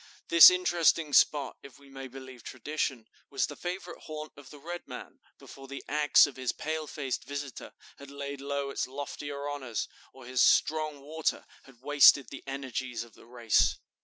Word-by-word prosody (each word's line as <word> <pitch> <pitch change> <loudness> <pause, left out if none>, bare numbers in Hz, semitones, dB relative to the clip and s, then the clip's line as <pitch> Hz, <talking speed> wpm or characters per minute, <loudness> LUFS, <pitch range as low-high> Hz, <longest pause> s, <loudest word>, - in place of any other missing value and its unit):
This 170 -1 +11
interesting 170 -4 +2
spot, 140 -2 +3
if 140 - -14
we 140 - -19
may 135 -1 -9
believe 130 -1 -11
tradition, 130 -2 -4 0.2
was 135 - 0
the 145 - -8
favorite 175 +1 -6
haunt 155 0 -7
of 140 -2 -14
the 145 - -12
red 175 +4 -8
man, - - -10 0.2
before 135 0 -13
the 140 0 -8
axe 150 0 +5
of 145 -3 -8
his 130 -1 -1
pale 155 0 -4
faced 135 -3 -4
visitor 140 -2 -7 0.3
had 140 - -11
laid 140 0 -7
low 140 0 -3
its - - -2
loftier 145 +1 -6
honors, 130 -6 -4 0.2
or 130 -2 -14
his 130 0 0
'strong 155 -2 +2
water' 155 +3 -2 0.2
had 130 -2 -19
wasted 140 -3 +6
the 135 - -10
energies 130 -3 -4
of 120 -2 -17
the - - -18
race." 120 -2 +2
140 Hz, 175 wpm, -29 LUFS, 130-150 Hz, 0.3 s, This